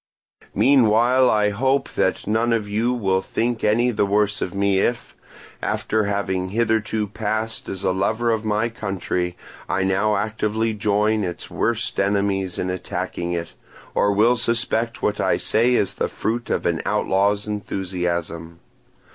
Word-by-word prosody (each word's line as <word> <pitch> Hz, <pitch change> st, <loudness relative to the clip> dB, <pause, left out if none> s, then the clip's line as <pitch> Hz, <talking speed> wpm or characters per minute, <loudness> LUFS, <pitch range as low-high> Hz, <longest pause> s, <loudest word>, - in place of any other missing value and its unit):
"Meanwhile 125 Hz, -1 st, +4 dB
I 105 Hz, -1 st, +2 dB
hope 135 Hz, +6 st, +1 dB
that -, -, 0 dB
none 115 Hz, +3 st, +1 dB
of 110 Hz, -3 st, -1 dB
you 110 Hz, +4 st, 0 dB
will 95 Hz, -6 st, +1 dB
think 115 Hz, +3 st, -2 dB
any 120 Hz, +4 st, +3 dB
the 105 Hz, -, +1 dB
worse 105 Hz, +1 st, +1 dB
of 90 Hz, -, -2 dB
me 100 Hz, -1 st, +2 dB
if, 120 Hz, +3 st, -1 dB, 0.5 s
after 110 Hz, -1 st, 0 dB
having 95 Hz, -2 st, -1 dB
hitherto 110 Hz, 0 st, 0 dB
passed 110 Hz, +2 st, -3 dB
as 95 Hz, -1 st, -5 dB
a -, -, +2 dB
lover 110 Hz, +5 st, 0 dB
of 110 Hz, -1 st, -1 dB
my 110 Hz, +1 st, +1 dB
country, 95 Hz, -5 st, -3 dB, 0.3 s
I 95 Hz, -, +1 dB
now 100 Hz, +3 st, +2 dB
actively 110 Hz, +1 st, -1 dB
join 105 Hz, +1 st, +1 dB
its 90 Hz, -2 st, -5 dB
worst 115 Hz, 0 st, -1 dB
enemies 100 Hz, -2 st, 0 dB
in 90 Hz, -, -1 dB
attacking 90 Hz, -1 st, -4 dB
it, 85 Hz, -1 st, -4 dB, 0.4 s
or 100 Hz, -, +2 dB
will 115 Hz, +5 st, +3 dB
suspect 115 Hz, 0 st, 0 dB
what 105 Hz, -, 0 dB
I -, -, +2 dB
say 120 Hz, +3 st, +2 dB
as 100 Hz, -, +1 dB
the -, -, -1 dB
fruit 120 Hz, +2 st, -3 dB
of -, -, -1 dB
an -, -, 0 dB
outlaw's 100 Hz, +2 st, +1 dB
enthusiasm. 90 Hz, -5 st, -3 dB
105 Hz, 150 wpm, -22 LUFS, 95-115 Hz, 0.5 s, Meanwhile